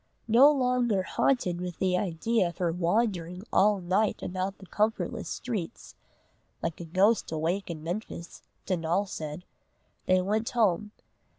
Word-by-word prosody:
No 250 +6 +7
longer 250 -7 +1
haunted 185 -5 0
with 180 -1 -5
the 185 -1 +1
idea 185 +3 +1
of 170 - -8
her 175 -2 0
wandering 180 0 0
all 205 0 +4
night 190 +4 0
about 185 +2 -3
the 195 - -13
comfortless 215 +4 -1
streets, 215 -9 -5 0.7
"like 165 0 -3
a - - -6
ghost 195 +6 +2
awake 165 +5 -1
in 155 -2 -6
Memphis," 175 0 -6 0.2
Donal 175 +1 0
said, 155 -2 -6 0.6
they 185 0 +5
went 215 +5 0
home. 210 -3 +1
185 Hz, 135 wpm, -28 LUFS, 175-215 Hz, 0.7 s, No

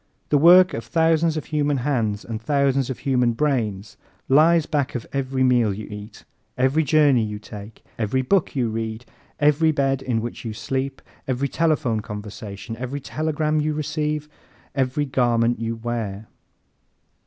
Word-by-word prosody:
The 150 - +4
work 180 +4 +7
of - - -4
thousands 160 -1 +2
of 155 - -4
human 145 -2 0
hands 120 -6 -1
and 115 -1 -5
thousands 140 0 +1
of 130 - -3
human 125 -3 +1
brains 110 -7 -1 0.3
lies 160 +3 +5
back 145 -5 -1
of 120 - -4
every 135 -1 0
meal 120 -4 +3
you 105 +2 -6
eat, 105 +1 -10 0.3
every 135 +5 +2
journey 145 -4 +4
you 105 -1 -4
take, 105 0 -11
every 115 +4 0
book 185 +4 +1
you 125 -3 +1
read, 110 +1 -4 0.3
every 150 +2 +4
bed 135 -2 0
in 125 -4 -1
which 120 +1 -6
you 115 -2 -4
sleep, 130 +4 -3 0.2
every 135 +1 0
telephone 150 -7 +1
conversation, 105 +1 -7
every 130 +4 -4
telegram 155 +1 -1
you 155 0 -1
receive, 150 0 -2 0.5
every 135 +2 0
garment 120 -3 +1
you 115 0 -2
wear. 110 -3 -4
130 Hz, 155 wpm, -23 LUFS, 115-150 Hz, 0.5 s, work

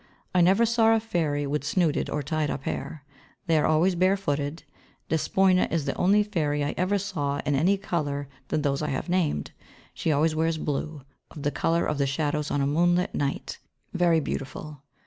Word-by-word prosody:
I 180 - +4
never 195 +6 +5
saw 225 -1 +4
a - - +2
fairy 160 -9 -1
with 145 0 -2
snooded 155 +1 0
or 150 - -2
tied 155 +1 -1
up - - -4
hair. 150 0 -5 0.4
They 165 -3 +2
are - - +2
always 160 +4 +3
bare 185 +3 +2
footed. 145 -3 -3 0.5
Despoina 185 +3 +2
is 165 -4 0
the 135 - -1
only 205 +3 +3
fairy 150 -8 -1
I 145 - -1
ever 185 +3 +1
saw 150 -8 -2
in 145 - +1
any 165 +8 +3
other 195 - -12
colour 145 -4 -2 0.2
than 150 - -1
those 140 -1 0
I 150 - -1
have 140 +4 -3
named. 170 - 0 0.4
She 160 - -1
always 155 +2 +2
wears 160 +1 +1
blue, 150 -1 -3 0.3
of 150 - -10
the 145 - +1
colour 165 +3 +1
of 150 -1 -2
the 140 - +2
shadows 150 +2 -1
on 145 - 0
a - - +2
moonlight 175 +5 +2
night, 140 -1 -3 0.3
very 175 -2 +3
beautiful. 145 0 -5
155 Hz, 195 wpm, -26 LUFS, 145-180 Hz, 0.5 s, never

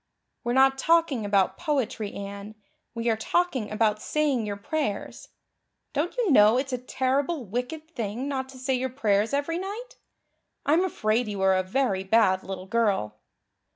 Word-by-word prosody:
"We're 240 0 -1
not 270 +1 +4
talking 325 -8 +2
about 200 -2 +2
poetry, 265 -10 -1
Anne 200 +1 -7 0.4
we 230 0 -2
are 225 - +3
talking 260 -2 0
about 215 -1 +1
saying 280 -7 0
your 205 -1 -3
prayers. 220 -1 -3 0.7
Don't 335 +10 -1
you 460 -8 +2
know 215 -2 +6
it's 265 0 -2
a 250 - -1
terrible 265 +3 -1
wicked 250 - -4
thing 235 0 -4
not 265 -2 -3
to 265 - -12
say 260 +1 -1
your 260 +1 -1
prayers 215 -4 +1
every 290 +4 -1
night? 460 +7 -7 0.7
I'm 320 +5 +4
afraid 225 - 0
you 205 -2 -4
are 190 0 +4
a 185 - +2
very 190 0 0
bad 190 -2 +3
little 190 -1 -6
girl." 195 - 0
245 Hz, 160 wpm, -26 LUFS, 205-285 Hz, 0.7 s, know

